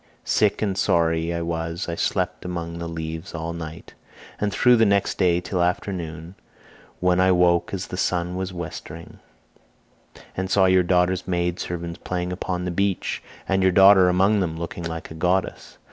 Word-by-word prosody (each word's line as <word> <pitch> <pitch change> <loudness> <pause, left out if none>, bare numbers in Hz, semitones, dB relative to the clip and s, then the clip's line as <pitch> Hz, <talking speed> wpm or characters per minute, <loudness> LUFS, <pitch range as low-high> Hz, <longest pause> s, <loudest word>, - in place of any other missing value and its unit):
Sick 105 0 +2
and 100 -3 0
sorry 85 -3 +1
as 85 - -2
I - - -3
was 85 +1 -3
I 85 - -3
slept 90 +1 -1
among 85 -2 -5
the 85 - -4
leaves 80 +2 -6
all 85 0 -4
night, 80 -1 -8 0.5
and 105 -1 0
through 125 +4 +4
the 115 - +4
next 100 0 +1
day 90 -2 +3
till 90 0 -2
afternoon, 85 -2 -3 0.7
when 90 0 +2
I 95 0 +4
woke 90 -1 +3
as 95 -1 -3
the 90 - -7
sun 90 -1 -1
was 95 0 -3
westering, 85 -1 -8 1.2
and 95 0 -3
saw 95 0 +4
your 95 0 +5
daughter's 90 +1 +1
maid 90 -1 -1
servants 85 -1 -5
playing 90 0 -3
upon 90 -1 -3
the 90 - -2
beach, 100 +1 -1 0.3
and 95 0 +1
your 95 0 +4
daughter 95 0 +7
among 95 +4 +3
them 80 -4 -2
looking 85 +1 -5
like 80 -1 -6
a - - -6
goddess. 90 +4 -1
90 Hz, 175 wpm, -23 LUFS, 85-95 Hz, 1.2 s, daughter